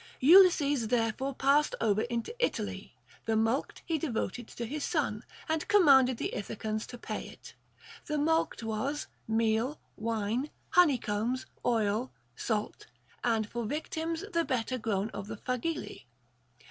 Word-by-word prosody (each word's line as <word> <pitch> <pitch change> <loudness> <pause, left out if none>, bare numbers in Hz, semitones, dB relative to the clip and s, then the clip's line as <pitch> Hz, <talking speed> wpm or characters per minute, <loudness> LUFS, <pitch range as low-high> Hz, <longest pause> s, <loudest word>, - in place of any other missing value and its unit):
Ulysses 290 - +6
therefore 245 +3 0
passed 280 +3 +3
over 215 -2 +2
into 235 - -3
Italy; - - -2 0.3
the 225 - +2
mulct 225 +5 0
he 325 -3 0
devoted 240 - -3
to 235 - -6
his 290 +5 -4
son, 255 -9 -1 0.2
and 315 0 -1
com 410 -2 +5
manded 265 -3 +6
the - - -3
Ithacans 215 +1 -4
to 245 - -8
pay - - -5
it. - - -13 0.5
The 300 -1 -1
mulct 320 -4 +1
was 240 +7 -2 0.2
meal, 225 +5 +1 0.2
wine, 225 +4 -1 0.2
honey 320 -6 +6
combs, 230 +4 -2 0.2
oil, 225 +1 +1 0.2
salt, 215 -2 -3 0.4
and 225 -3 +1
for 235 0 -4
victims 320 - -3
the 335 0 +2
better 255 -2 -1
grown 215 -1 -1
of 200 0 -6
the - - -6
phagili. 255 +9 -3
245 Hz, 140 wpm, -30 LUFS, 220-295 Hz, 0.5 s, Ulysses